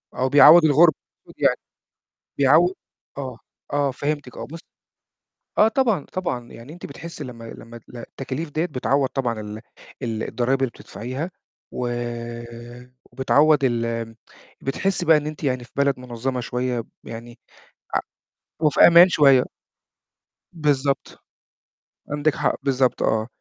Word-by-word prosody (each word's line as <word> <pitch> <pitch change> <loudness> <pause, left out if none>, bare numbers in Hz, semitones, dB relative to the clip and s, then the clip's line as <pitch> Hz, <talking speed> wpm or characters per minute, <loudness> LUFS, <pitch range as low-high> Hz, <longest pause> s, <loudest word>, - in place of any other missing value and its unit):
أو 130 +1 0
بيعوّض 155 +4 +8
الغُربة 155 +2 +6 0.3
المفروض - - -15
يعني. - - +3 0.8
بيعو 170 +7 +5 0.4
آه، 130 -4 -6 0.3
آه 145 -1 +1
فهمتِك، 145 -1 -4
آه - - -6
بصّ 165 +3 -9 1.0
آه 215 - +6
طبعًا، 225 - +1
طبعًا، 125 -10 -4
يعني 120 +7 -11
أنتِ 175 - -10
بتحسي 155 +1 -8
لمّا 120 -3 -9
لمّا 115 +1 -11
التكاليف 135 +5 -6
دَيّة 155 +4 -1
بتعوّض 140 -2 0
طبعًا 120 -5 -2
ال 105 +1 -8 0.4
ال 110 -2 -3
الضرايب 130 +2 0
اللي 130 - +1
بتدفعيها، 130 - -6 0.4
و 125 - -3 1.2
وبتعوّض 145 +4 +3
ال 115 -2 -1 0.5
بتحسي 175 +6 -1
بقى 160 -1 +6
إن 150 0 -3
أنتِ 155 +1 -7
يعني 130 -3 -1
في 120 - -18
بلد 140 -1 +1
مُنظَّمة 125 +1 -4
شوية، 125 -1 -2 0.2
يعني 115 +1 -10 0.6
ع - - +3 0.6
وفي 150 -3 +2
أمان 170 +2 +8
شوية. 140 -6 +5 1.1
بالضبط. 145 -4 -1 0.9
عندِك 145 +1 +1
حق، - - 0
بالضبط 130 -3 +1
آه. 110 0 +1
135 Hz, 130 wpm, -23 LUFS, 120-155 Hz, 1.2 s, بيعوّض